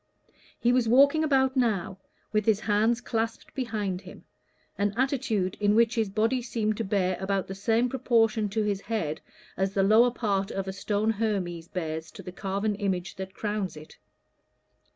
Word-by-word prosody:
He 240 +1 +3
was 245 -3 +2
walking 280 +6 +5
about 265 -3 +2
now, 205 -7 0 0.3
with 215 0 +1
his 215 -1 +3
hands 220 +3 +2
clasped 225 -1 -3
behind 210 -7 -2
him, 190 -1 -12 0.5
an 205 +1 -1
attitude 240 -8 0
in 205 0 +3
which 230 0 +4
his 225 -4 0
body 225 +5 +1
seemed 215 -3 -1
to 230 - -1
bear 190 -2 0
about 190 0 -1
the 195 - -6
same 225 +5 +1
proportion 230 -4 +1
to 215 +2 0
his 200 -2 -1
head 165 -9 -3 0.4
as 190 +1 -1
the 195 - +3
lower 220 +5 +6
part 200 -5 -1
of 195 0 -4
a 190 - -3
stone 210 +2 0
Hermes 195 -6 -2
bears 160 -3 -4
to - - -10
the 180 - -7
carven 200 +3 -2
image 190 -4 -2
that 190 0 -7
crowns 205 -5 -3
it. 155 +1 -13
210 Hz, 175 wpm, -27 LUFS, 190-230 Hz, 0.5 s, lower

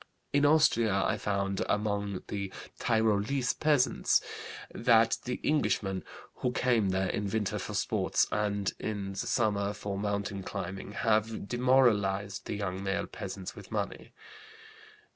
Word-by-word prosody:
In 145 0 +5
Austria 115 -10 +4
I - - +1
found, 100 -1 -1
among 100 -2 -1
the 100 -2 -4 0.3
Tyrolese 110 +3 +2
peasants, 150 -4 +3 0.5
that 115 -1 +4
the 125 0 -3
Englishmen, 100 -10 +1 0.3
who 125 - 0
come 120 -5 +2
there 95 0 0
in 105 -1 -2
winter 110 -1 -1
for - - -5
sports - - +1
and 100 -2 0
in 100 -2 -3
the - - -8
summer 105 -3 +1
for 100 -1 -4
mountain 100 -1 -2
climbing, 95 +1 -5
have 110 -1 0
demoralized 110 -6 +2
the - - -2
young 95 -2 -3
male 95 0 -1
peasants - - -7
with - - -12
money. - - -3
105 Hz, 130 wpm, -30 LUFS, 100-115 Hz, 0.5 s, In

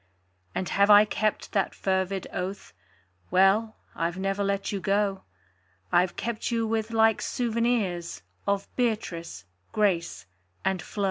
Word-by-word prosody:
And 185 - -1
have 200 +1 +3
I 205 0 +9
kept 215 0 -1
that 195 -3 0
fervid 190 0 -1
oath? 185 - -5 0.6
Well 195 +4 +3 0.2
I've 170 +1 -1
never 195 +1 -1
let 200 0 -1
you 200 - -2
go: 195 0 0 0.7
I've 180 0 +3
kept 230 -1 -3
you 230 -1 0
with 220 0 -1
like 225 -1 +3
souvenirs 230 -7 -1 0.2
Of 200 0 0
Beatrice, 170 - -2 0.3
Grace 170 - 0 0.4
and 190 -2 +1
Flo. 205 - -9
200 Hz, 130 wpm, -27 LUFS, 185-220 Hz, 0.7 s, I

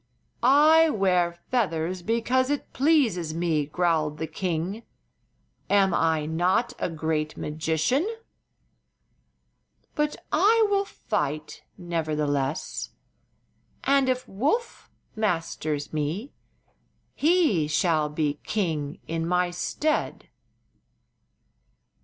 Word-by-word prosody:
"I 310 +5 +6
wear 185 - +2 0.2
feathers 180 -7 0
because 235 +6 +1
it 290 -1 -3
pleases 235 - +2
me," 165 -4 0
growled 155 -2 0
the 160 - -3
king. 175 +5 -3 0.9
"Am 195 -2 +4
I 160 -2 +1
not 175 +9 +1
a - - -1
great 155 -1 -2
magician? 160 - 0 1.8
But 300 0 0 0.2
I 435 +7 +4
will 400 0 +2
fight, 155 - -3 0.2
nevertheless, 150 -5 -2 0.9
and 275 -1 +3
if 255 0 -1
Woof 295 - -2 0.3
masters 165 -8 -2
me 155 - -2 0.8
he 305 - +2
shall 155 -1 +1
be 150 -1 -1
king 160 -9 -2
in 165 0 -2
my 180 0 +1
stead." 300 - -2
175 Hz, 90 wpm, -26 LUFS, 155-255 Hz, 1.8 s, I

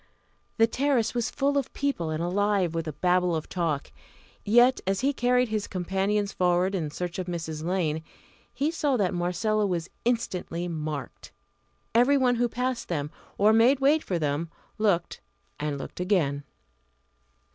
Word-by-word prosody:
The 225 - +6
terrace 255 0 +1
was 240 -2 -1
full 280 +1 +1
of 270 - -5
people, 275 - -1
and 155 +1 -2
alive 195 -1 +1
with 165 -1 -3
a - - -2
Babel 180 +1 +2
of 155 - -4
talk. 165 -6 -2 0.5
Yet, 240 +4 +5
as 195 0 +1
he 280 +2 +2
carried 250 -1 +2
his 215 -1 -2
companions 195 +3 -1
forward 180 +1 +2
in 165 -6 -1
search 175 +4 -5
of 185 - -4
Mrs. 160 -3 -4
Lane, 160 -3 -1 0.5
he 280 +6 -1
saw 290 -5 0
that 195 -5 +1
Marcella 200 +5 0
was 175 -2 -3
instantly 180 -7 -1
marked. 155 -5 -5 0.6
Every 250 +5 +5
one 250 -2 +2
who 240 0 +1
passed 250 +1 -2
them, 150 -3 -3 0.3
or 210 +2 +5
made 240 +5 +5
way 285 +3 +4
for 185 - -3
them, 150 +1 -1 0.3
looked 190 -6 +1 0.4
and 145 -1 -2
looked 135 - -8
again. 160 -7 0
190 Hz, 155 wpm, -27 LUFS, 170-240 Hz, 0.6 s, The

